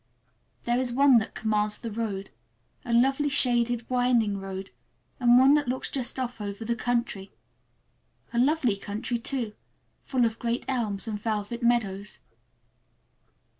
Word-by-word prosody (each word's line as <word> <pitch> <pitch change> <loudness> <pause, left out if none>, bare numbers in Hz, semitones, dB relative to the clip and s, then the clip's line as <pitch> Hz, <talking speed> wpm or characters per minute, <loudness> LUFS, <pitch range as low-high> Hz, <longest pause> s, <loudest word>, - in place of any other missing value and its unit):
There 240 +1 +1
is 255 -1 -1
one 265 -1 +6
that 220 - -6
commands 210 -1 0
the 230 - -6
road, 205 -3 -4 0.5
a 245 - -5
lovely, 270 +5 +3
shaded, 240 -3 +2
winding 245 -5 +2
road, 195 0 -6 0.5
and 240 -1 +6
one 265 +2 +7
that 295 -2 +2
just 260 +2 -3
looks 260 -2 -3
off 245 -3 -4
over 205 +2 -5
the 235 - 0
country. 235 -5 -2 1.0
A 235 - +1
lovely 260 -5 +2
country, 220 +4 -3
too, 235 -3 -3 0.5
full 255 -3 +1
of 225 -1 -2
great 235 +1 -2
elms 225 -5 -2
and 210 -2 -4
velvet 215 +2 -3
meadows. 210 -4 0
235 Hz, 140 wpm, -27 LUFS, 210-250 Hz, 1.0 s, one